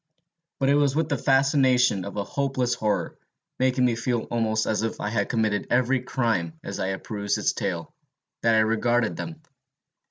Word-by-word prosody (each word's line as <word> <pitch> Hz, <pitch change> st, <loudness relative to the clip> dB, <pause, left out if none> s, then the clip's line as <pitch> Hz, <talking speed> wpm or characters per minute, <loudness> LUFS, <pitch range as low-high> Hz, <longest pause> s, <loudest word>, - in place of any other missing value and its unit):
But 135 Hz, -, +2 dB
it -, -, +5 dB
was 145 Hz, -1 st, +2 dB
with 160 Hz, 0 st, 0 dB
the 145 Hz, -, +1 dB
fascination 130 Hz, -6 st, +3 dB
of 100 Hz, -, -7 dB
a 100 Hz, -, 0 dB
hopeless 130 Hz, 0 st, -1 dB
horror, 110 Hz, -3 st, -2 dB, 0.4 s
making 130 Hz, 0 st, +2 dB
me 120 Hz, -, +2 dB
feel 120 Hz, 0 st, -1 dB
almost 110 Hz, -2 st, +1 dB
as 110 Hz, -, 0 dB
if 115 Hz, 0 st, -3 dB
I 105 Hz, -, -2 dB
had 110 Hz, -, -1 dB
committed 110 Hz, -3 st, 0 dB
every 125 Hz, +1 st, +2 dB
crime 110 Hz, -11 st, -1 dB
as 100 Hz, -, -5 dB
I 95 Hz, 0 st, -1 dB
perused 105 Hz, 0 st, -2 dB
its 105 Hz, -, +1 dB
tale, 95 Hz, -6 st, -4 dB, 0.5 s
that 115 Hz, -1 st, +3 dB
I 110 Hz, -, +5 dB
regarded 115 Hz, +1 st, +1 dB
them. 160 Hz, -1 st, -7 dB
120 Hz, 180 wpm, -25 LUFS, 105-130 Hz, 0.5 s, it